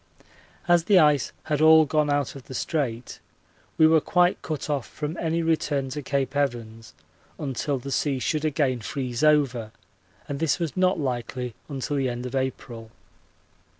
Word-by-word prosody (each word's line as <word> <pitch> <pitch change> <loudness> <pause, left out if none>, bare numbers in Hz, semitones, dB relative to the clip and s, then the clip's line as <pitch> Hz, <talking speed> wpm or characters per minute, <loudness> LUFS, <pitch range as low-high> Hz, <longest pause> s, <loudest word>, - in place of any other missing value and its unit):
As 175 -1 +4
the 200 -1 +5
ice 150 -6 +4
had 150 -1 -1
all 160 0 +7
gone 150 0 +1
out 145 -2 0
of 135 -2 -11
the 130 - -9
Strait 125 -7 -3 0.6
we 160 - +6
were 160 0 +5
quite 180 +3 +2
cut 155 -3 -4
off 140 -6 -2
from 150 +2 -5
any 165 0 -1
return 150 -4 0
to 150 +3 -5
Cape 140 0 -2
Evans 115 - -3 0.4
until 140 -1 -2
the 140 +2 -7
sea 140 0 0
should 150 +4 -1
again 135 -4 0
freeze 125 +2 -4
over, 135 -7 +2 0.6
and 140 -1 -4
this 160 -2 +1
was 170 -4 -3
not 185 -1 +2
likely 125 -2 -3 0.2
until 140 +1 -3
the 135 -2 0
end 120 +1 -5
of 125 - -6
April. 130 -4 -4
140 Hz, 165 wpm, -25 LUFS, 125-155 Hz, 0.6 s, all